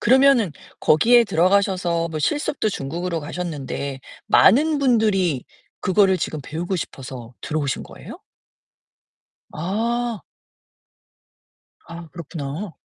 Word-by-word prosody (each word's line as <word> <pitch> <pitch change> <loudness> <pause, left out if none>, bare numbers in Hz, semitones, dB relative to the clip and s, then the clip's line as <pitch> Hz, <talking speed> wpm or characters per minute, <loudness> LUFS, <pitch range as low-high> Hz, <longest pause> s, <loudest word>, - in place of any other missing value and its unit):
그러면은 260 -4 +5 0.3
거기에 235 +10 +5
들어가셔서 180 -2 +1
뭐 155 -1 -4
실습도 285 - 0
중국으로 170 0 -3
가셨는데 145 -4 -5 0.3
많은 295 +8 +5
분들이 210 - +2 0.4
그거를 190 0 +3
지금 155 -1 -3
배우고 175 +6 -3
싶어서 125 -6 -7
들어오신 150 -4 -2
거예요? - - -11 1.3
아. 225 +6 -2 1.7
아, 170 0 -9
그렇구나. 165 +2 -6
180 Hz, 250 characters per minute, -22 LUFS, 155-215 Hz, 1.7 s, 그러면은